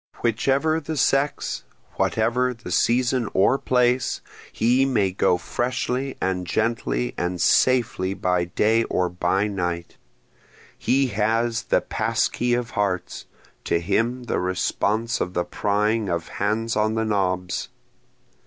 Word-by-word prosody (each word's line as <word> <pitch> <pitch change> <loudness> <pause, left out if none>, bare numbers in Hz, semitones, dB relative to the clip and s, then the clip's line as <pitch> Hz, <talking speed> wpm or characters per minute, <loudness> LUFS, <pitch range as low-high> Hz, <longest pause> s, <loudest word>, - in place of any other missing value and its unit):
Whichever 135 +7 +1
the 160 0 -5
sex, 140 +2 0 0.3
whatever 125 +3 +1
the 115 - -9
season 125 -1 +2
or 100 +8 +4
place, 125 0 +1 0.3
he 125 +4 +2
may 110 -8 +1
go 90 -1 +2
freshly 125 +5 -2
and 90 -1 -1
gently 110 - -1
and 90 0 -2
safely 100 -1 +2
by 90 -2 0
day 110 +6 +2
or 90 -1 0
by 90 +3 0
night, 90 -4 -3 0.8
He 135 +1 +2
has 115 +2 0
the - - +2
pass - - 0
key 120 0 0
of 120 -1 -3
hearts, 100 -4 -2 0.4
to 85 - +1
him 120 +8 0
the 120 - -1
response 105 +5 -1
of 90 - -3
the 90 - 0
prying 105 +1 0
of 85 -1 -2
hands 115 +2 -1
on 110 +1 +1
the 110 0 0
knobs. 95 -4 -1
110 Hz, 130 wpm, -23 LUFS, 95-125 Hz, 0.8 s, or